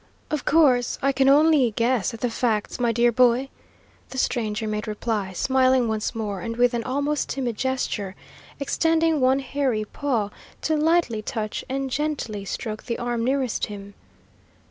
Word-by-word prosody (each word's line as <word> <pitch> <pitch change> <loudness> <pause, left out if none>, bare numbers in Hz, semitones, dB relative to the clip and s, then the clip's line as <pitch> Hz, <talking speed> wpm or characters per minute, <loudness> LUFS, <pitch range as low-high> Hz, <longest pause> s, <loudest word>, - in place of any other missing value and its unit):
"Of 305 -2 -2
course, 270 -6 +3
I 275 - +4
can 270 0 +3
only 295 -3 +5
guess 235 -2 +1
at 230 - -10
the 245 - +1
facts, 225 -1 -1
my 240 -1 +2
dear 235 +1 +3
boy," 250 +2 +3 0.6
the 260 - -8
stranger 220 -4 -1
made 210 0 -3
reply, 210 -2 -2
smiling 260 +3 +3
once 220 0 -2
more, 205 -4 -3
and, 230 +4 -4
with 245 0 +3
an 235 -1 -1
almost 285 +4 -1
timid 250 -4 -2
gesture, 225 -6 -2 0.4
extending 325 +1 +1
one 260 +1 +4
hairy 265 -5 -1
paw 230 -5 -2 0.3
to 315 - +1
lightly 310 -7 +2
touch 215 0 -4
and 270 0 -2
gently 265 -9 -2
stroke 215 +2 -5
the 235 - -2
arm 240 -1 -2
nearest 260 -1 0
him. 200 -1 -9
245 Hz, 160 wpm, -24 LUFS, 220-275 Hz, 0.6 s, only